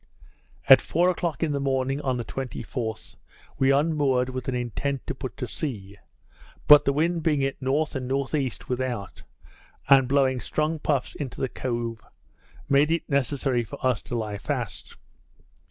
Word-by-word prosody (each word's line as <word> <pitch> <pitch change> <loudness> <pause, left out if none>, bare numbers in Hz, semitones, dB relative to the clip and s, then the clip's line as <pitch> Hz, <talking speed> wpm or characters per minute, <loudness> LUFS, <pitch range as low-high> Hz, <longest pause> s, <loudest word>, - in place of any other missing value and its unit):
At 135 -2 +9
four 175 +3 +2
o'clock 170 -2 -2
in 160 - +1
the 140 - -1
morning, 135 0 0
on 130 -3 -1
the 120 - -4
24th, 125 -3 -5 0.4
we 135 - +4
unmoored 140 -3 +2
with 130 -1 -5
an 130 - -1
intent 125 +3 -3
to - - -3
put 130 -5 -7
to 125 - -4
sea; 100 - -5 0.7
but 150 0 +9
the 140 - +3
wind 165 +4 0
being 150 -3 +1
at 135 0 -1
N. 130 - -4 0.3
and 130 -1 -4
N.E. 135 0 0 0.2
without, 125 -5 -3 0.7
and 135 -2 +6
blowing 130 -1 +2
strong 155 +5 -1
puffs 145 -4 -1
into 135 -4 -6
the 130 - -1
cove, 120 -3 -4 0.6
made 140 +2 +4
it 165 0 0
necessary 135 -2 0
for 110 - -9
us 130 -1 +2
to 120 - -6
lie 105 -2 -4
fast. - - -4
135 Hz, 160 wpm, -25 LUFS, 125-145 Hz, 0.7 s, At